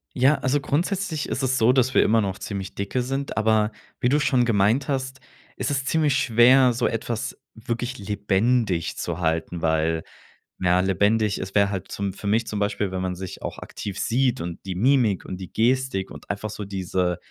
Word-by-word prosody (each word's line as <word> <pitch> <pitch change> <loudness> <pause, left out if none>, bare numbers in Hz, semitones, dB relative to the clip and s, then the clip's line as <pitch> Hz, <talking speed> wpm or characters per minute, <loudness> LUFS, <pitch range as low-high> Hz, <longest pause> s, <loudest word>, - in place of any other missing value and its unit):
Ja, 135 +4 +4
also 135 +1 0
grundsätzlich 170 +1 -1
ist 135 - -2
es 130 0 +1
so, 120 +3 +4
dass 130 0 +2
wir - - +6
immer 115 0 +3
noch 95 -1 -2
ziemlich 100 -2 -6
dicke 100 +6 -2
sind, 135 +2 -3
aber 110 0 +2 0.3
wie 125 - +2
du 145 +2 +3
schon 125 -4 +2
gemeint 110 +4 +2
hast, 130 -1 -2 0.4
ist - - -2
es 135 -1 -1
ziemlich 150 -3 +2
schwer, 125 +1 +5
so 120 +1 -1
etwas 115 0 -2 0.2
wirklich 120 +2 -4
lebendig 105 -1 0
zu 85 0 -3
halten, 80 +1 -1
weil 80 0 +1 0.6
ja, 90 0 +3
lebendig 100 +2 +2
ist 95 +2 -6
wäre 100 0 +4
halt 95 -2 -5
zum 100 -2 -3
für 100 - -7
mich 115 +3 +2
zum 105 -2 -4
Beispiel, 100 -1 -1
wenn 95 0 -3
man 90 -1 -2
sich 95 0 -7
auch - - -5
aktiv 100 -1 -7
sieht 125 +1 +1
und 85 0 -6
die 95 - -3
Mimik 120 -2 +2
und 90 - -6
die 95 -2 -9
Gestik 125 -4 0
und - - -12
einfach 100 +1 -3
so 105 - -6
diese- 90 -2 -1
110 Hz, 195 wpm, -24 LUFS, 95-130 Hz, 0.6 s, wir